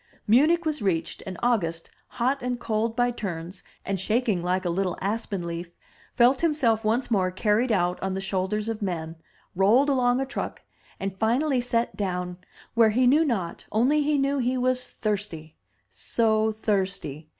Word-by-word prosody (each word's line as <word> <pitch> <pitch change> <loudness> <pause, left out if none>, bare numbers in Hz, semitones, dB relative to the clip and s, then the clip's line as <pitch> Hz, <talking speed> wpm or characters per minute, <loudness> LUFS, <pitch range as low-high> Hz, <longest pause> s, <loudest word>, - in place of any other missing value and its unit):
Munich 310 +10 +4
was 305 -4 -1
reached, 180 -5 -1
and 185 -2 -5
August, 170 -9 0 0.3
hot 260 +3 +1
and 245 -1 -2
cold 225 0 -1
by 245 +1 +2
turns, 180 -5 -6 0.2
and 195 -1 -2
shaking 215 -1 0
like 180 +1 -1
a 175 - +1
little 185 0 -1
aspen 200 -3 -3
leaf, 170 0 -5 0.5
felt 250 +2 +4
himself 265 -9 +2
once 235 +3 0
more 190 -4 +2
carried 210 +6 +1
out 180 -3 +1
on 190 0 -2
the - - -2
shoulders 195 +2 -2
of 225 -1 -3
men, 165 -4 -3 0.4
rolled 220 +10 +4
along 250 -3 +3
on - - 0
a - - 0
truck, 265 - -5 0.4
and 195 0 -3
finally 245 +6 +1
set 240 -1 -1
down, 180 -2 -3 0.3
where 230 -2 +5
he 250 +4 +2
knew 290 +6 +5
not, 200 - -3
only 260 +8 +3
he 295 0 +1
knew 275 0 +1
he 255 +1 0
was 255 0 0
thirsty 195 -7 -4 0.3
— - - -43
so 220 -1 +1
thirsty! 190 -8 -2
215 Hz, 170 wpm, -26 LUFS, 185-245 Hz, 0.5 s, where